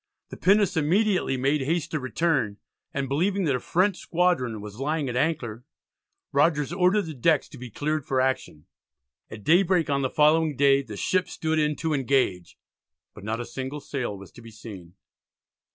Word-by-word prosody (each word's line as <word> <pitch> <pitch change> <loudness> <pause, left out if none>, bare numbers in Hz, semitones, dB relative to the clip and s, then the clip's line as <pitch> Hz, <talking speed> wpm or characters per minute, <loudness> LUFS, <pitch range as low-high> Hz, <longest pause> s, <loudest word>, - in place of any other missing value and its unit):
The - - -9
pinnace 195 -1 +3
immediately 180 -1 +1
made 135 +3 +1
haste 160 +4 -1
to 155 - -1
return, 130 -6 0 0.3
and 140 -1 -2
believing 185 +8 0
that 145 -6 +1
a - - -1
French 185 +7 +1
squadron 165 - 0
was 105 +2 -9
lying 150 +1 -1
at 125 - -4
anchor, 125 -6 -1 0.7
Rogers 150 +1 +2
ordered 185 +3 +3
the 160 - -6
decks 150 +4 +2
to 140 - -12
be 125 -1 -8
cleared 150 +6 -2
for 130 - +1
action. 130 - -2 0.6
At 105 -2 -10
daybreak 175 - +3
on 140 0 +1
the 130 - 0
following 155 +1 +3
day 140 0 +4
the 110 -6 -9
ships 185 - 0
stood 160 -1 -1
in 150 0 +1
to 160 +1 -2
engage, 130 - 0 0.6
but - - -13
not 110 +2 -3
a - - -5
single 135 +4 -5
sail 125 -8 -4
was 95 -1 -13
to - - -14
be 115 - -12
seen. 100 -6 -11
145 Hz, 180 wpm, -25 LUFS, 125-165 Hz, 0.7 s, day